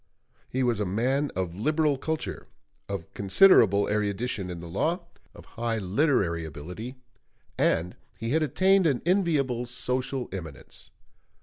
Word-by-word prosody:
He 130 +1 -1
was 120 -3 +1
a 105 - 0
man 130 +9 0
of 90 -2 -2
liberal 150 - +1
culture, 160 +4 -4 0.4
of 100 -4 -5
considerable 100 - +5
erudition 105 -1 -1
in 85 -1 -6
the 85 - -8
law, 160 - 0 0.3
of - - -13
high 115 -1 -3
literary 100 - +1
ability, 90 - -7 0.6
and 85 +2 +1 0.2
he 115 +1 -3
had 160 +3 +2
attained 185 +5 +3
an 135 -5 0
enviable 150 -10 +1
social 125 +1 -2
eminence. 80 -7 -8
120 Hz, 130 wpm, -27 LUFS, 95-145 Hz, 0.6 s, considerable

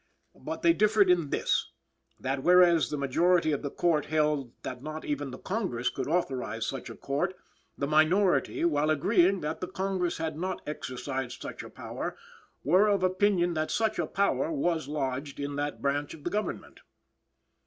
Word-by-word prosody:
But - - -6
they 335 - +6
differed 210 - +4
in 170 -5 +2
this; - - 0 0.5
that, 135 +1 -2
whereas 175 0 +5
the 150 - -3
majority 160 +4 +2
of 145 - -1
the 145 - -3
Court 160 0 +1
held 150 -5 +1
that 125 -1 -6
not 155 +2 -6
even 145 -1 -2
the 130 - -7
Congress 185 - -2
could - - -4
authorize 130 -9 -1
such 135 -2 -5
a - - -8
Court, 155 +7 -2 0.4
the 140 - -1
minority, 165 +5 +3
while 150 -2 +2
agreeing 180 +4 +3
that 150 +2 -4
the 180 - -2
Congress 190 -2 -2
had 160 -1 -3
not 185 +1 -3
exercised 130 -2 -4
such - - -7
a - - -10
power, - - -6 0.5
were 185 +8 +4
of 200 -3 +2
opinion 185 -1 +2
that 155 -1 -1
such 220 -1 0
a - - 0
power 165 -7 0
was 160 0 0
lodged 140 -1 -3
in 140 0 -3
that 145 0 -3
branch 145 +2 -1
of 150 - -16
the 175 - -2
Government. 210 +1 -4
155 Hz, 175 wpm, -29 LUFS, 140-180 Hz, 0.5 s, they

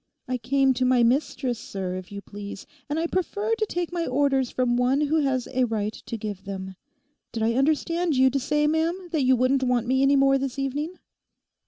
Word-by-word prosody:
I 250 0 -2
came 265 +3 +2
to 255 +1 -1
my 250 -1 +4
mistress, 255 -1 0
sir, 190 -4 -5
if 185 0 -8
you 200 0 -6
please; 200 -1 -8 0.2
and 295 - -1
I 330 - 0
prefer 405 +5 -1
to 450 -1 0
take 350 -2 -3
my 340 -1 -1
orders 270 -1 +1
from 250 -1 0
one 250 +3 +2
who 300 +2 +1
has 265 -4 0
a 255 0 +2
right 215 -2 -2
to 230 - -7
give 205 -3 -6
them. 190 -1 -6 0.6
Did 225 -2 -3
I 230 +1 +2
understand 315 +5 +1
you 260 0 +5
to 275 - 0
say, 295 +3 +1
ma'am, 330 +4 0
that 315 -4 +1
you 260 0 +4
wouldn't 255 +2 +2
want 250 -2 +1
me 260 +2 +2
any 275 +1 +4
more 275 0 +4
this 270 0 -3
evening? 290 +6 -2
265 Hz, 210 wpm, -25 LUFS, 240-295 Hz, 0.6 s, you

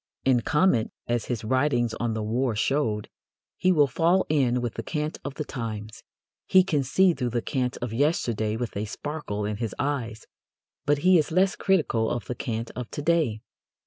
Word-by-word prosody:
In 130 -3 +4
comment, 150 -5 +2 0.2
as 120 -2 0
his 120 -2 -3
writings 120 -1 +1
on 115 0 -2
the 110 - -2
war 120 +2 0
showed, 110 -3 0 0.5
he 185 - +2
will 150 -5 +5
fall 170 +6 +2
in 130 -5 +2
with 120 -2 -3
the - - -4
cant 150 -1 -3
of 140 -1 -5
the 155 - -3
times. 110 -5 -6 0.5
He 185 0 +6
can 155 -6 +1
see 180 +7 +3
through 125 -5 -2
the 120 0 -1
cant 125 -2 -1
of 120 -2 -3
yesterday 115 -6 0
with 120 -1 -4
a 105 +2 -2
sparkle 115 -3 -4
in 105 0 -2
his 115 -3 -3
eyes, 120 -6 -2 0.6
but 145 0 +4
he 185 -2 +7
is 150 - 0
less 190 +4 +3
critical 150 - +1
of 120 -4 -3
the - - -3
cant 115 -1 -4
of 125 -2 -5
to 145 - -5
day. 155 -10 +1
125 Hz, 190 wpm, -26 LUFS, 115-150 Hz, 0.6 s, he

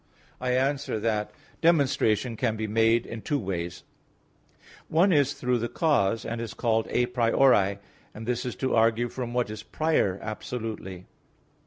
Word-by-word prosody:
I 125 0 0
answer 135 -2 0
that, 105 -1 -1 0.3
Demonstration 130 -8 +2
can 110 -1 0
be 110 0 -3
made 115 +2 +2
in 115 -1 -7
two 145 - -1
ways: 90 -7 -4 1.0
One 175 +4 +3
is 145 -2 +3
through 125 -1 0
the 120 +1 -2
cause, 115 - +1
and 115 0 -3
is 115 -3 -6
called 115 -2 +1
a 125 - +2
priori, 115 -4 +3 0.4
and 110 - -7
this 120 0 -1
is 125 - -4
to 130 - -1
argue 115 +1 +3
from 120 -1 -5
what 120 -3 0
is 110 - -6
prior 155 -12 0
absolutely. 110 -4 -6
115 Hz, 155 wpm, -27 LUFS, 110-130 Hz, 1.0 s, One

